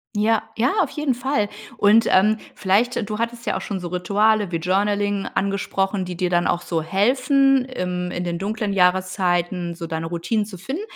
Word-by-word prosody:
Ja, 215 +1 +2
ja, 250 - +2
auf 290 - -4
jeden 295 -2 -1
Fall. 245 -4 -1 0.3
Und, 210 +3 +5
ähm, 210 +4 +4 0.2
vielleicht 210 +3 +1
du 210 - -3
hattest 235 +1 -3
ja - - 0
auch - - -3
schon 195 -3 -4
so 175 - -5
Rituale 205 +3 +1
wie 165 - 0
Journaling 200 +3 0
angesprochen, 195 0 -1
die 180 -1 -6
dir 180 -1 0
dann 175 -1 +2
auch 175 - 0
so 165 -2 -1
helfen, 260 - +3
im 180 -8 -4
in 175 - -3
den 170 -1 -2
dunklen 205 +1 -2
Jahreszeiten 180 -1 +1
so 165 -1 -7
deine 160 0 -3
Routine 175 +6 -1
zu 200 -3 -9
finden. 270 - -5
200 Hz, 185 wpm, -22 LUFS, 180-220 Hz, 0.3 s, Und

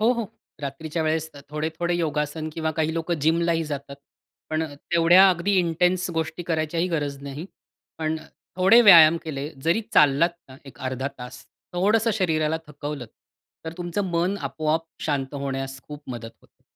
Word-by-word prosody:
हो, 230 +3 +4
हो. 235 -3 -3 0.4
रात्रीच्या 155 +4 -3
वेळेस 160 0 -1
अ, 145 - -11
थोडे-थोडे 160 +3 -2
योगासन 155 -1 -2
किंवा 160 0 -2
काही 160 0 +1
लोकं 165 +1 -1
जिमलाही 165 +2 +2
जातात. 140 -2 -6 0.5
पण 155 0 0
तेवढ्या 170 +5 +5
अगदी 180 +3 0
इंटेन्स 180 +1 +1
गोष्टी 160 +1 -2
करायचीही 165 +1 -1
गरज 145 -5 -2
नाही. 140 +4 -7 0.5
पण 160 0 -1
अ, 155 - -14 0.3
थोडे 190 +6 +6
व्यायाम 170 -6 +9
केले, 145 -2 -4 0.2
जरी 170 +7 +2
चाललात 150 +4 +5 0.2
ना, 130 - -12
एक 135 - -13
अर्धा 130 +1 -3
तास, 125 0 -9 0.3
थोडंसं 210 +5 +2
शरीराला 160 -5 +1
थकवलंत, 145 -4 -6 0.6
तर 160 - -5
तुमचं 175 +3 -2
मन 175 +4 0
आपोआप 160 +1 -1 0.2
शांत 140 -2 -2
होण्यास 135 -1 -4
खूप 150 0 -10
मदत 115 -2 -6
होते. - - -29
160 Hz, 155 wpm, -24 LUFS, 145-170 Hz, 0.6 s, व्यायाम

